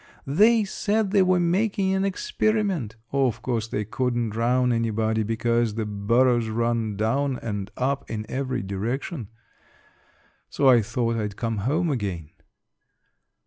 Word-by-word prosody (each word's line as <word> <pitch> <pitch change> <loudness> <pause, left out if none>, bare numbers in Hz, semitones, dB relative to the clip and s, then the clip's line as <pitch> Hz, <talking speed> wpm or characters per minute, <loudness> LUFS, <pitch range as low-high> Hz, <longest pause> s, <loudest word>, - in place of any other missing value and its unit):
They 215 +10 +4
said 205 +1 -1
they 200 -1 +4
were 185 -1 +3
making 190 +2 +1
an 190 0 +1
'experiment.' 200 - -1 0.2
Of 135 -4 +1
course 115 -3 -1
they 105 -2 -3
couldn't 120 0 -1
drown 125 +3 +1
anybody 110 -1 0
because 115 0 0
the 110 -1 -2
burrows 115 +3 +2
run 115 -2 -1
down 130 +5 0
and 105 -3 -4
up 135 +2 -1
in 110 -1 -4
every 130 -3 -2
direction. 115 - -3 1.2
So 140 - +1
I 125 -3 +7
thought 115 +1 -1
I'd 105 -2 -3
come 115 0 -2
home 165 +2 +1
again." 95 - -3
120 Hz, 135 wpm, -25 LUFS, 110-150 Hz, 1.2 s, I